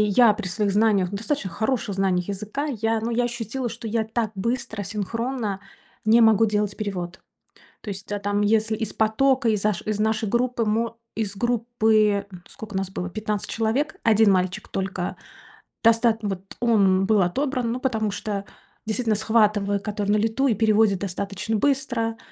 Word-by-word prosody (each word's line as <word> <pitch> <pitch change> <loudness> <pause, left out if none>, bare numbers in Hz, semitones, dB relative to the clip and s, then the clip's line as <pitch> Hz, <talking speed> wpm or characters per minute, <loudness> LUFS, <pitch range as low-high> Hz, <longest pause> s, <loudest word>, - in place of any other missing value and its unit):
я 235 -4 +7
при 215 -2 -5
своих 200 +2 0
знаниях, 200 -3 +2
достаточно 215 +2 -2
хороших 220 -1 -1
знаниях 190 -1 0
языка, 210 +9 -3
я 225 0 +1
ну 230 +2 -2
я 240 +1 +1
ощутила, 240 +1 -3
что 230 +1 -8
я 225 +1 0
так 220 -1 -2
быстро, 230 +1 -2
синхронно 215 +1 -3 0.5
не 225 +2 +6
могу 225 -1 +6
делать 210 -1 -1
перевод. 190 -4 -4 0.6
То - - -7
есть, 195 0 -7
а, 205 - -1
там 205 0 0
если 220 +1 +2
из 220 -1 -3
потока, 255 +4 +2
из 210 -3 0
аш 210 -4 +1
из 215 -1 -2
нашей 220 0 +1
группы, 240 0 0
мо 230 +2 -1 0.2
из 210 -3 -2
группы, 220 -3 +2
м, 180 -2 -11
скока 210 -2 -8
нас 190 -1 -2
было? 180 -1 -4
15 210 0 -3
человек. 245 +9 0
1 220 -2 +5
мальчик 185 -1 0
только, 190 -2 -3 0.7
достат 230 0 +4
вот 195 -3 -2 0.2
он 195 -5 +3
был 210 0 +3
отобран. 250 +6 0
Ну 245 - -3
потому 220 -5 0
что 200 -1 -4 0.4
действительно 220 0 0
схватывает 210 -2 +2
который 205 -1 -3
на 210 - +4
лету 225 +6 +1
и 235 - +2
переводит 215 -2 +3
достаточно 200 +3 -3
быстро. 245 -3 0
215 Hz, 165 wpm, -24 LUFS, 200-230 Hz, 0.7 s, я